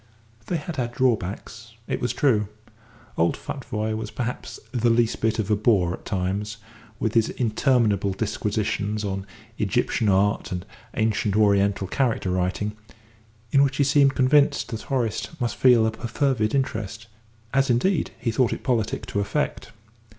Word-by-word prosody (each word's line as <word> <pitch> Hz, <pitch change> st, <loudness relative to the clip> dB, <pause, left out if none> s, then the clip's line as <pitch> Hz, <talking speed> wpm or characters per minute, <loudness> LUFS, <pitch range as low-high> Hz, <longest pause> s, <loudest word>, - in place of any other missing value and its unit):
They 175 Hz, -, 0 dB
had 160 Hz, +2 st, -6 dB
had 120 Hz, -2 st, -2 dB
drawbacks, 115 Hz, -1 st, -1 dB
it -, -, -2 dB
was 125 Hz, -, 0 dB
true. 120 Hz, -5 st, +2 dB, 0.7 s
Old 85 Hz, +1 st, +2 dB
Futvoye 110 Hz, -5 st, -4 dB
was 110 Hz, -1 st, -4 dB
perhaps 125 Hz, +1 st, -5 dB
the 120 Hz, -2 st, +2 dB
least 115 Hz, 0 st, +2 dB
bit 110 Hz, 0 st, +1 dB
of 110 Hz, -1 st, -1 dB
a -, -, +5 dB
bore 100 Hz, -5 st, +2 dB
at -, -, -9 dB
times, 100 Hz, +2 st, -2 dB, 0.4 s
with 110 Hz, -2 st, -1 dB
his 115 Hz, -1 st, +3 dB
interminable 110 Hz, -4 st, +1 dB
disquisitions 105 Hz, 0 st, -2 dB
on 95 Hz, 0 st, -3 dB, 0.3 s
Egyptian 110 Hz, +1 st, +1 dB
art 100 Hz, +2 st, +2 dB
and 90 Hz, 0 st, -4 dB, 0.3 s
ancient 110 Hz, -2 st, +1 dB
Oriental 100 Hz, -2 st, +3 dB
character 115 Hz, -3 st, 0 dB
writing, 95 Hz, +3 st, -1 dB, 0.8 s
in 140 Hz, -, +5 dB
which 140 Hz, -1 st, +2 dB
he 145 Hz, -, +4 dB
seemed 140 Hz, -1 st, +4 dB
convinced 140 Hz, +2 st, +3 dB
that 115 Hz, -2 st, -4 dB
Horace 120 Hz, -6 st, -1 dB
must 120 Hz, -2 st, -1 dB
feel 125 Hz, -4 st, +5 dB
a 110 Hz, -, +1 dB
perfervid 115 Hz, 0 st, 0 dB
interest, 115 Hz, -4 st, -2 dB, 0.5 s
as, 135 Hz, 0 st, +3 dB
indeed, 150 Hz, +8 st, +2 dB
he 115 Hz, -, -1 dB
thought 120 Hz, +1 st, +2 dB
it -, -, -7 dB
politic 115 Hz, -5 st, 0 dB
to 100 Hz, -, -2 dB
affect. 100 Hz, -, -2 dB
110 Hz, 150 wpm, -24 LUFS, 105-125 Hz, 0.8 s, a